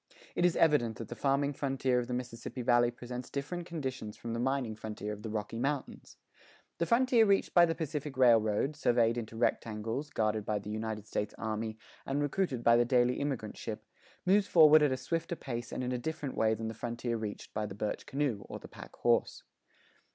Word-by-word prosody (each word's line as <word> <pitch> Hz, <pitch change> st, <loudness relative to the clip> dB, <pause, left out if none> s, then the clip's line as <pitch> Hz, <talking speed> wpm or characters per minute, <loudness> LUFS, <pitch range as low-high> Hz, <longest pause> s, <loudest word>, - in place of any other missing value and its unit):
It 175 Hz, -, +2 dB
is 175 Hz, -, +3 dB
evident 130 Hz, -9 st, +3 dB
that 115 Hz, -, -7 dB
the 120 Hz, -, -5 dB
farming 140 Hz, +3 st, +1 dB
frontier 135 Hz, -2 st, 0 dB
of 120 Hz, -, -3 dB
the 125 Hz, -, -3 dB
Mississippi 125 Hz, 0 st, -5 dB
Valley 120 Hz, 0 st, +4 dB
presents 125 Hz, +1 st, -7 dB
different 170 Hz, +5 st, -4 dB
conditions 130 Hz, -9 st, -5 dB
from 115 Hz, -, -5 dB
the 115 Hz, -, -2 dB
mining 130 Hz, -2 st, 0 dB
frontier 105 Hz, -1 st, -5 dB
of 105 Hz, -, -9 dB
the 110 Hz, -, -5 dB
Rocky 105 Hz, +1 st, -3 dB
Mountains. 140 Hz, +1 st, -3 dB, 0.6 s
The 170 Hz, -, +1 dB
frontier 245 Hz, -1 st, +4 dB
reached 200 Hz, -2 st, +2 dB
by 175 Hz, -1 st, +7 dB
the 165 Hz, -, -1 dB
Pacific 150 Hz, -3 st, -4 dB
Railroad, 115 Hz, +2 st, +4 dB
surveyed 120 Hz, -4 st, +3 dB
into 115 Hz, -2 st, -5 dB
rectangles, 115 Hz, +4 st, -1 dB
guarded 110 Hz, -4 st, 0 dB
by 105 Hz, 0 st, -1 dB
the 105 Hz, +1 st, -6 dB
United 110 Hz, -1 st, -4 dB
States 105 Hz, -1 st, -3 dB
Army, 110 Hz, 0 st, -3 dB, 0.3 s
and 135 Hz, +1 st, -1 dB
recruited 145 Hz, -3 st, -1 dB
by 115 Hz, 0 st, +6 dB
the 120 Hz, -, +5 dB
daily 125 Hz, 0 st, +2 dB
immigrant 135 Hz, -7 st, -3 dB
ship, -, -, -6 dB, 0.4 s
moves 200 Hz, +2 st, +4 dB
forward 155 Hz, -2 st, +7 dB
at 145 Hz, -2 st, +3 dB
a 130 Hz, -, 0 dB
swifter 165 Hz, +5 st, -2 dB
pace 120 Hz, -5 st, -5 dB
and -, -, -3 dB
in 125 Hz, -, -2 dB
a 125 Hz, -, -1 dB
different 145 Hz, +1 st, -4 dB
way 110 Hz, 0 st, +2 dB
than 110 Hz, +1 st, -4 dB
the 110 Hz, -, -4 dB
frontier 120 Hz, +1 st, -3 dB
reached 110 Hz, -2 st, -6 dB
by 105 Hz, 0 st, -2 dB
the 100 Hz, -, -8 dB
birch 105 Hz, +1 st, -3 dB
canoe 135 Hz, -7 st, -1 dB
or -, -, -5 dB
the -, -, -11 dB
pack -, -, -12 dB
horse. -, -, +1 dB
125 Hz, 205 wpm, -32 LUFS, 110-145 Hz, 0.6 s, by